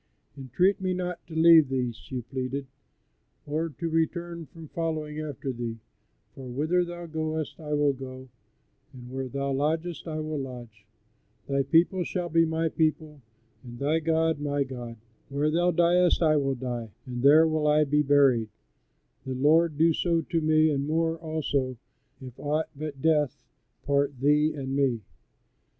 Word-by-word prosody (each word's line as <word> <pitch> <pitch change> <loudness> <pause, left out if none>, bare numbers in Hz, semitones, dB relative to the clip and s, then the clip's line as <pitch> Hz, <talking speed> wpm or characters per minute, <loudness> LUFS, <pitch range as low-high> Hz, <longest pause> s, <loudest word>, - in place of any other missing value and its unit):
"Entreat 180 - +1
me 185 -1 0
not 180 -1 -3
to 165 - -9
leave 160 -3 +7
thee," 125 -2 -1
she 125 +2 -7
pleaded, 130 +2 -4 0.8
"or 155 +3 -2
to 165 +2 -5
return 165 0 -2
from 165 -1 -12
following 155 -2 -3
after 145 -3 -4
thee; 115 -1 -5 0.6
for 130 -1 -9
whither 155 +8 +1
thou 175 0 -7
goest 155 -1 -4
I 150 -2 -5
will 145 -1 +3
go, 130 0 -9 0.7
and 125 -1 -11
where 130 0 -4
thou 140 +1 -2
lodgest 160 +4 -1
I 155 -1 -3
will 155 -1 -3
lodge; 120 -6 -9 0.6
thy 140 0 +1
people 170 +6 +3
shall 175 -1 -3
be 165 0 +4
my 160 0 0
people, 155 -2 -1 0.4
and 120 -1 -10
thy 150 +5 +1
God 160 -1 +1
my 145 -1 0
God; 120 -3 -8 0.3
where 145 +2 0
thou 175 +2 +2
diest 175 +1 +3
I 155 -1 +4
will 135 -2 +1
die, 120 -3 -4 0.2
and 125 -2 -5
there 155 +4 +7
will 155 -1 0
I 150 0 +4
be 150 +1 +2
buried; 135 -6 +3 0.7
the 130 -1 -4
Lord 155 +3 +3
do 165 +1 +4
so 165 0 +1
to 165 +1 -1
me 155 0 +3
and 140 0 -1
more, 165 +1 0
also, 145 -5 -2 0.4
if 130 -2 -11
aught 155 +2 -1
but 145 -2 -6
death 150 -4 +1 0.4
part 140 -2 +1
thee 150 +3 +3
and 135 -1 -4
me." 130 -5 +1
150 Hz, 160 wpm, -27 LUFS, 135-160 Hz, 0.8 s, leave